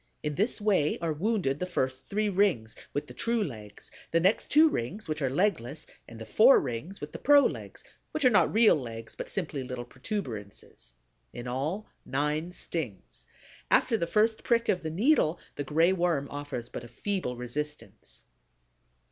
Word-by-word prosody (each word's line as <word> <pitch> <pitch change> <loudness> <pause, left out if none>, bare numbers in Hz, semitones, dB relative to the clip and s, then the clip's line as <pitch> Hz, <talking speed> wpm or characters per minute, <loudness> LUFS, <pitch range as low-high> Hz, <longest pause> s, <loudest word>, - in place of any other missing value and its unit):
In 150 -1 -1
this 210 - 0
way 195 -8 +2
are 165 -2 -1
wounded 170 -5 0
the 180 - -2
first 130 -7 -2
three 210 +1 0
rings, 185 - +1 0.2
with 145 - -2
the - - -11
true 230 -1 0
legs; 110 - -8 0.2
the 165 - +3
next 190 +6 +2
two 310 +2 +7
rings, 195 - -3
which 155 -1 -3
are 135 - +1
legless; 155 - 0 0.2
and 115 - -11
the 110 - -7
four 245 - +6
rings, 135 +10 -5
with 150 +1 -7
the - - -7
pro 290 +1 +7
legs, - - -4 0.3
which 310 -3 -2
are 250 - +7
not 210 - +4
real 220 0 +6
legs, 115 -5 -7
but - - -6
simply 160 -7 -3
little 125 -1 -5
protuberances. 120 - -7 0.4
In 120 - -7
all, 150 +12 -2 0.2
nine 150 +5 -1
stings. 110 - -6 0.4
After 230 - +4
the 170 -6 -1
first 220 +4 +2
prick 235 -1 +2
of 180 - +2
the 160 - -3
needle, 180 - +2 0.2
the 145 - -3
Gray 165 +6 +3
Worm 170 -6 0
offers 145 -4 -5
but 120 - -7
a - - -9
feeble 180 - -3
resistance. 120 - -6
155 Hz, 175 wpm, -29 LUFS, 125-205 Hz, 0.4 s, two